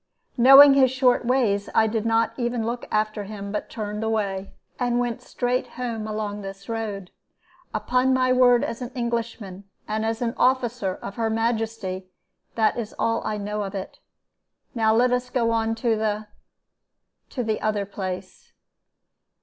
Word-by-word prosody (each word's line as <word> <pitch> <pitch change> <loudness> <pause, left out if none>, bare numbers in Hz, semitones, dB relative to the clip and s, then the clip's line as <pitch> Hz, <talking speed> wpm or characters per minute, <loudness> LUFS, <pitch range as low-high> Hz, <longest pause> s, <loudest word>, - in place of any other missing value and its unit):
Knowing 275 +3 +9
his 265 -2 +5
short 250 -1 +2
ways, 225 -5 +1
I 220 - +5
did 220 0 -1
not 225 0 +2
even 240 -2 -2
look 240 +1 -4
after 215 -1 -1
him, 200 -1 -7
but 210 - -4
turned 210 -1 -4
away, 200 -3 -2 0.3
and 245 -1 +1
went 240 -2 -1
straight 250 +1 -2
home 230 -3 -3
along 210 -1 -4
this 195 0 -9
road. 210 -5 -4 0.6
Upon 250 +4 +1
my 255 -1 +3
word 245 -1 +5
as 230 - -4
an 245 - -4
Englishman, 230 -5 -4 0.2
and 215 +1 -2
as 225 0 -1
an 230 -1 -1
officer 245 -6 +1
of 200 - -7
her 225 -1 0
Majesty, 225 -4 -2 0.5
that 220 +1 +2
is 220 -2 -6
all 230 0 0
I 215 - -2
know 210 +1 -3
of 200 0 -5
it. 190 -1 -6 0.7
Now 220 -3 +2
let 245 +2 +3
us 250 0 0
go 235 -3 +1
on 225 0 0
to 230 -1 +1
the 215 0 -1 1.0
to 250 - -3
the 220 -1 -2
other 210 -2 0
place. 185 -2 -7
225 Hz, 160 wpm, -24 LUFS, 210-245 Hz, 1.0 s, Knowing